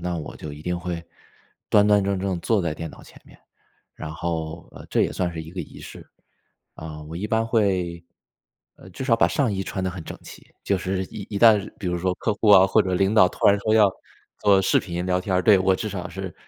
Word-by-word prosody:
那 90 0 -3
我 80 - -7
就 75 -2 -8
一 75 - -10
定 90 +1 -2
会 85 -1 -5 0.6
端 105 0 +5
端 105 -1 +4
正 100 0 -1
正 95 -2 -2
坐 105 +2 +1
在 85 -2 -1
电 80 +1 -6
脑 - - -14
前 - - -17
面， - - -19 0.6
然 80 - -7
后， 80 0 -4
呃， - - -12
这 - - +2
也 - - -1
算 90 -2 -2
是 80 -1 -6
一 80 - -11
个 90 +1 -5
仪 75 - -10
式。 - - -11 0.7
啊， 80 -1 -8
我 80 +2 -9
一 100 +5 -4
般 110 0 +1
会， 95 -7 0 0.7
呃， 95 - -14
至 115 +8 -7
少 120 -3 +3
把 - - +3
上 135 -6 0
衣 95 -1 -2
穿 95 - -4
得 95 - 0
很 90 -3 -8
整 - - -8
齐， - - -12 0.2
就 100 - +1
是 95 +1 -2
一 100 +1 -9
一 - - 0
旦 105 -2 +5
比 100 - -8
如 90 0 -1
说 90 +1 0
客 105 - -1
户 105 0 +1
啊， 95 -2 +8
或 95 - +3
者 95 - -2
领 95 +3 +2
导 95 -4 +6
突 - - -3
然 100 0 +4
说 110 +2 0
要 105 -3 +5 0.5
做 100 -2 +4
视 95 - +3
频 90 0 -5
聊 90 0 +1
天 95 0 -1
儿， 90 - +2
对， 100 -1 +6
我 95 0 +3
至 110 +3 -4
少 90 -3 -5
是 95 -2 -7
95 Hz, 265 characters per minute, -23 LUFS, 85-100 Hz, 0.7 s, 啊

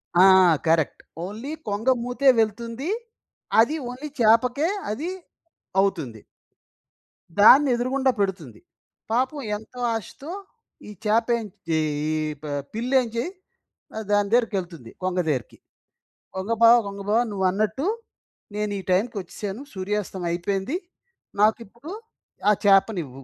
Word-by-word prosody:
ఆ! 180 +2 +7 0.4
Correct. 160 -2 +2 0.2
Only 220 +9 -6 0.2
కొంగమూతే 245 +5 +1
వెళ్తుంది. 230 - -1 0.7
అది 235 +8 +4
ఓన్లీ 260 +5 -6
చేపకే 245 +7 +3 0.2
అది 300 +11 -3 0.7
అవుతుంది. 155 - -2 1.2
దాన్నెదురుగుండా 260 +3 +5
పెడుతుంది. 175 - -2 0.5
పాపం 255 +5 0 0.2
ఎంతో 220 +4 -10 0.2
ఆశతో 275 - -7 0.6
ఈ - - -9 0.2
చాపేంచ్ 225 -1 +1 0.2
ఈ - - +2 0.3
ఈ - - 0 0.3
ప - - -7 0.3
పిల్లేంజి 235 0 0 0.7
ఆహ్, 220 - -4
దాని 205 -1 +2
దేరికెళ్తుంది, 185 - -1
కొంగ 185 0 0
దేరికి. 130 -7 -3 0.8
కొంగ 190 +4 -3
బావ, 230 +1 +9
కొంగ 200 0 -7
బావ 220 +2 +4
నువ్వన్నట్టు 205 - 0 0.7
నేను 210 0 -1
ఈ - - -5
టైంకొచ్చెశాను, 200 +1 -2
సూర్యాస్తమం 190 -1 -3
అయిపోయింది. 195 - -2 0.6
నాకిప్పుడు 230 - 0 0.6
ఆ - - +7
చేపనివ్వు 185 - +2
215 Hz, 100 wpm, -24 LUFS, 190-245 Hz, 1.2 s, బావ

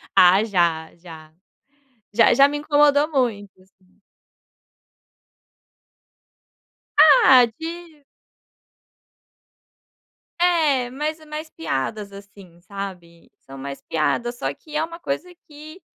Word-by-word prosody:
Ah 185 +3 +6
já, 170 -6 -1
já. 160 -2 -14 0.8
Já, 230 - +5
já 275 0 +5
me 290 +1 -4
incomodou 290 0 +2
muito, 225 -8 -2
assim. 190 0 -30 3.0
Ah, 270 -4 +7
de 330 -2 -9 2.4
É, 310 -8 +1
mas 300 +4 -4
é 310 - -17
mais 305 +1 -8
piadas, 210 - -4
assim, 195 -3 -15
sabe, 180 -3 -10
são 135 0 -13
mais 140 +1 -8
piadas, 240 +10 -2
só 275 - -3
que 305 -1 -14
é 310 - 0
uma 335 +1 -8
coisa 355 +2 -5
que 310 +4 -13
245 Hz, 100 wpm, -21 LUFS, 185-305 Hz, 3.0 s, Ah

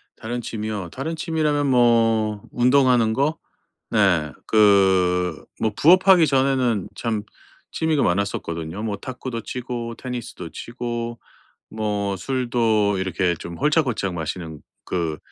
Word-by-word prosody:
다른 120 +2 -5
취미요? 105 -5 -4
다른 160 +5 -4
취미라면 155 -3 0
뭐 115 -4 +3
운동하는 125 -2 +3
거? 140 +6 0 0.5
네. 90 -8 +2 0.2
그 95 -5 +3 0.2
뭐 110 - +1
부업하기 180 +1 +6
전에는 130 -6 +1
참 110 -3 -2 0.5
취미가 160 -3 0
많았었거든요. 85 -2 -2
뭐 105 -2 -2
탁구도 125 -1 -6
치고 120 -2 -5
테니스도 120 -9 -6
치고 120 +3 -5 0.5
뭐 105 -2 -2
술도 115 -5 +1
이렇게 95 -1 0
좀 85 +1 -8
홀짝홀짝 135 - +1
마시는 80 -1 -5 0.2
그 85 -4 -2
115 Hz, 250 characters per minute, -22 LUFS, 95-130 Hz, 0.5 s, 부업하기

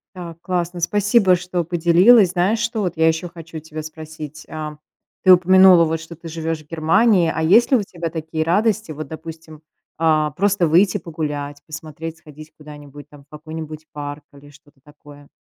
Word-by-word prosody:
Да, 170 -3 -8
классно, 175 -1 -3
спасибо, 200 +2 +3
что 180 0 -3
поделилась. 175 +5 +4
Знаешь, 190 +5 0
что 230 -2 -2
вот 180 -3 -2
я 160 0 +3
ещё 160 +2 -1
хочу 165 -1 -10
тебя 155 0 -8
спросить, 155 -1 -10
а, 155 -1 -6 0.5
ты 185 - +6
упомянула, 185 -1 +6
вот, 160 0 -2
что 165 +1 -11
ты 165 +1 -12
живёшь 160 -1 -4
в 150 - -31
Германии. 170 +2 +2
А 160 - -2
есть 220 - +4
ли 260 - +6
у 210 - -2
тебя 170 -3 -6
такие 160 0 -4
радости, 210 +2 0
вот, 155 -1 -7
допустим, 160 0 -10 0.4
а, 155 -2 +1
просто 190 +1 +1
выйти 190 +6 +3
погулять, 150 -4 -5
посмотреть, 160 +1 -8
сходить 155 0 -14
куда-нибудь, 145 -1 -12
там, 145 -1 -16
в - - -36
какой-нибудь 155 0 -9
парк 145 0 -7
или 145 +1 -16
что-то 145 0 -22
такое? 145 -1 -17
160 Hz, 175 wpm, -20 LUFS, 155-180 Hz, 0.5 s, ты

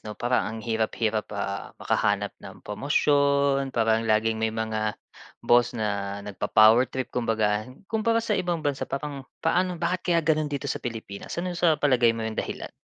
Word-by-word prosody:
'no? 105 -1 -8
Parang 120 +1 0
ang 110 +1 -6
hirap-hirap, 110 -1 -1
ah, 100 -1 -4
makahanap - - 0
ng - - -12
promosyon, 140 +3 +2
parang 115 -2 +1
laging 110 +1 +2
may 110 - +2
mga 110 -1 -2 0.5
boss 120 0 +4
na 100 -2 -2
nagpa-power 110 +4 +4
trip. 130 0 -5
Kumbaga, 110 -2 0 0.2
kumpara 225 +2 +1
sa 220 - 0
ibang 175 -5 -1
bansa, 145 -2 -1
parang 140 -1 -5 0.2
paano, 180 0 +1
bakit 175 +2 -1
kaya 170 -1 +4
gano'n 155 -1 +2
dito 140 -2 -4
sa - - -2
Pilipinas? 110 -4 -6
Ano 180 +1 -2
sa 170 -2 +3
palagay 125 -6 +3
mo 115 - -3
'yong 110 0 -4
dahilan? - - -6
120 Hz, 165 wpm, -26 LUFS, 110-150 Hz, 0.5 s, boss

